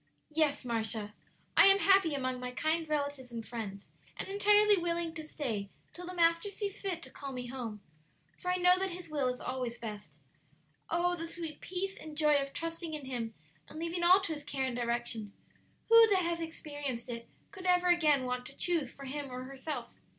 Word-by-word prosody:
"Yes, 300 -3 +1
Marcia; 220 -3 -2 0.4
I - - +9
am 390 0 +8
happy 385 -6 +4
among 255 -2 -1
my 250 0 -3
kind 315 +5 0
relatives 285 -4 -2
and 230 -1 -6
friends; 205 -4 -6 0.3
and - - -5
entirely 415 +1 +5
willing 340 -2 -1
to 315 -2 -6
stay 230 -10 -3 0.2
till 355 0 -8
the 365 - -5
Master 335 +3 +3
sees 400 0 -5
fit 360 -4 -3
to - - -7
call 275 -1 -7
me 250 -1 -5
home, 240 -5 -6 0.6
for 360 - -3
I 360 - +3
know 360 0 +5
that 385 0 +1
His 355 -1 -8
will 290 -4 0
is 250 0 -2
always 250 -2 -3
best. 210 -3 -8 0.7
Oh, 350 +1 +2
the 330 -1 -5
sweet 330 -2 -7
peace 385 +2 -3
and 310 -1 -9
joy 300 -2 +5
of 275 0 -4
trusting 330 0 -4
in 295 -3 -6
Him 235 -4 -4 0.3
and - - -10
leaving 335 +2 -2
all 365 +3 +8
to 335 - -2
His 295 -1 -7
care 275 -2 -2
and 255 -2 -2
direction! 235 -3 -2 0.6
Who 460 0 +9
that 385 -4 +3
has 340 0 -1
experienced 290 -7 -4
it 235 -1 -6 0.2
could 370 -2 -7
ever 360 0 +4
again 305 -6 +4
want 250 0 -2
to 270 - -10
choose 330 -8 +1
for 275 - -10
him 280 +1 -4
or 250 0 -5
herself?" 275 +3 -5
300 Hz, 200 wpm, -32 LUFS, 250-345 Hz, 0.7 s, I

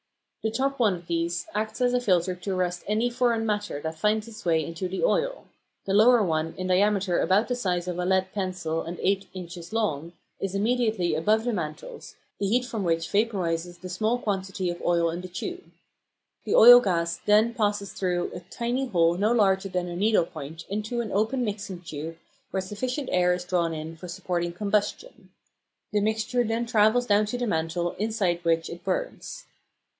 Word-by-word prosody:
The 220 - 0
top 275 +4 -1
one 215 -6 +3
of 175 -1 -11
these 170 +1 -1
acts 215 +2 -3
as 245 0 +3
a 250 - +2
filter 185 -5 +2
to 180 +2 -4
arrest 180 -1 -1
any 220 +4 +1
foreign 235 -2 +1
matter 210 -7 -2
that 160 0 -5
finds 215 +3 +1
its 220 -1 -11
way 160 -3 +2
into 165 +3 -4
the 185 +1 -4
oil; - - +1 0.4
the 195 - -1
lower 225 +2 +6
one, 160 -2 -1
in 185 - -3
diameter 190 0 +2
about 200 +4 +3
the 250 - 0
size 180 -7 -1
of 180 -1 -3
a 180 - 0
lead 190 0 +1
pencil 180 -5 -2
and 170 +1 -6
eight 195 0 +1
inches 175 -1 -8
long, 170 -8 -1 0.3
is 195 0 -3
immediately 215 -5 +1
above 210 +8 +2
the 240 0 -1
mantles, 180 - -6 0.2
the 200 - 0
heat 245 +5 +2
from 225 -4 -4
which 165 -1 0
vaporises 180 -5 0
the 185 - -7
small 215 +6 0
quantity 190 -4 -2
of 175 - -8
oil 170 -1 +2
in 170 +2 -5
the 185 - -7
tube. 360 - -6 0.8
The - - +1
oil 245 +2 +10
gas 170 -6 0
then 215 +3 +4
passes 205 -4 -1
through 180 -2 -1
a - - -5
tiny 235 +9 -3
hole 170 -5 +2
no 210 +3 +2
larger 195 -4 +2
than 180 -1 -2
a 175 - -5
needle 205 -1 +3
point 160 0 -9
into 215 +4 -2
an 220 - -5
open 225 +5 +1
mixing 200 -4 -5
tube 160 0 -7 0.3
where 190 - -1
sufficient 250 +8 -4
air 180 0 +3
is 180 0 -7
drawn 170 -3 0
in 160 +1 -6
for 180 +3 -10
supporting 175 -1 -3
combustion. 210 - -2 0.6
The 210 - +2
mixture 220 +3 0
then 225 +1 -1
travels 230 +1 +3
down 210 -1 +3
to 245 - -3
the 245 - -1
mantle, 170 -2 -1
inside 200 -5 0
which 165 -1 +1
it 170 +1 -9
burns. - - -4
195 Hz, 190 wpm, -26 LUFS, 175-220 Hz, 0.8 s, oil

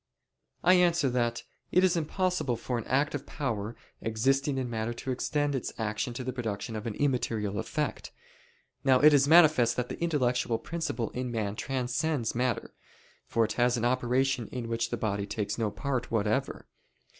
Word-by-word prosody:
I 180 - +6
answer 170 -6 +3
that, 120 -1 0 0.3
It 180 - +4
is 185 -1 +4
impossible 170 -4 0
for 120 +1 -3
an 115 - -7
active 140 +1 0
power 115 -6 -3 0.3
existing 135 +5 +1
in 130 -1 -1
matter 115 0 -3
to 130 - -4
extend 145 +3 0
its 130 - -2
action 110 +3 -2
to 130 - -4
the 130 0 -3
production 110 -3 -4
of 110 +1 -4
an 110 - -3
immaterial 115 -7 0
effect. - - -3 0.7
Now 130 -2 +5
it 150 +2 +7
is 140 -1 +5
manifest 155 -8 +6
that 125 -1 -2
the - - -7
intellectual 125 -8 +1
principle 130 -4 -3
in 125 0 -3
man 110 -3 -2
transcends 130 +1 -1
matter; 125 -1 -1 0.5
for 115 -1 +2
it - - -3
has 125 0 +3
an 120 - -1
operation 125 0 +1
in 120 -3 -5
which 115 0 -1
the 120 - -2
body 100 -2 -2
takes 100 0 -3
no 110 -2 +1
part 130 +2 -3
whatever. 110 +4 -1
125 Hz, 170 wpm, -29 LUFS, 115-140 Hz, 0.7 s, it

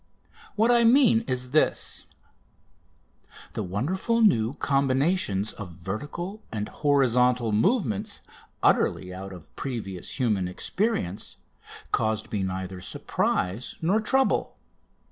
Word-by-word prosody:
What 225 +3 +4
I 240 -1 +5
mean 235 -1 +6
is 125 0 -2
this: 155 - +1 1.5
The - - -3
wonderful 165 - -1
new 120 - +4
combinations 135 - +1
of 90 -5 -8
vertical 145 - -5
and 105 -2 -3
horizontal 125 -4 +2
movements, 110 - 0 0.4
utterly 90 -1 +2
out 95 +1 -7
of 90 -3 -13
previous 105 -9 -5
human 105 -7 +1
experience, 100 - -2 0.5
caused 110 0 0
me 105 - -1
neither 95 -1 -4
surprise 90 +5 -2
nor 190 +7 +2
trouble. 265 +4 +1
125 Hz, 105 wpm, -26 LUFS, -, 1.5 s, mean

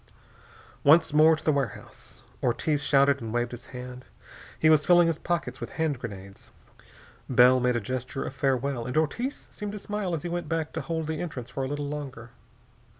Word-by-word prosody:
Once 160 +1 +5
more 155 +1 +6
to 155 - -11
the 155 - +4
warehouse. 140 -4 -5 0.2
Ortiz 145 +5 0
shouted 140 -1 +3
and 115 -1 -5
waved 120 +1 -1
his 120 0 -9
hand. 125 0 -8 0.5
He 155 - +3
was 155 -2 +5
filling 175 +2 +6
his 165 -2 0
pockets 175 -1 -3
with - - -6
hand 160 -5 -1
grenades. 100 -4 -9 0.8
Bell 125 0 +6
made 125 0 +1
a - - +1
gesture 130 +4 -4
of - - -5
farewell 135 -2 -1
and 125 - -3
Ortiz 240 - -1
seemed 210 -1 -6
to - - -5
smile 205 -3 -3
as 150 - -6
he 175 - -3
went 175 -2 -3
back 165 -2 -2
to 160 - -3
hold 160 +3 -3
the 155 0 -3
entrance 135 -9 -6
for 135 - -3
a - - -2
little 145 +1 -3
longer. 135 -5 -7
140 Hz, 195 wpm, -27 LUFS, 125-160 Hz, 0.8 s, more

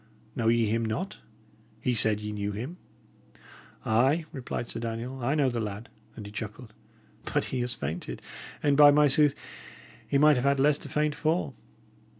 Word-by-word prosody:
Know 115 - -1
ye 115 0 +3
him 115 +2 0
not? 140 - -3 0.6
He 125 - 0
said 110 -2 +2
ye 105 0 -4
knew 105 -1 -3
him!" 125 - -6 1.1
"Ay," 135 +9 +2
replied 130 -5 -5
Sir - - -5
Daniel, 120 +3 -5
"I 135 +5 +1
know 140 -4 +3
the 120 -1 -3
lad;" 105 +1 -5 0.3
and 105 - -8
he 100 - -9
chuckled. 110 +1 -7 0.6
"But - - +1
he 130 - 0
has 125 0 -2
fainted; 80 - -5 0.4
and, 145 -1 +3
by 145 0 +9
my 150 +1 +5
sooth, 145 +1 +4 0.7
he 140 - +2
might 150 0 +5
have 125 - -1
had 140 0 +3
less 145 +1 +3
to - - -7
faint 150 0 0
for! 155 -2 -1
125 Hz, 175 wpm, -28 LUFS, 110-145 Hz, 1.1 s, by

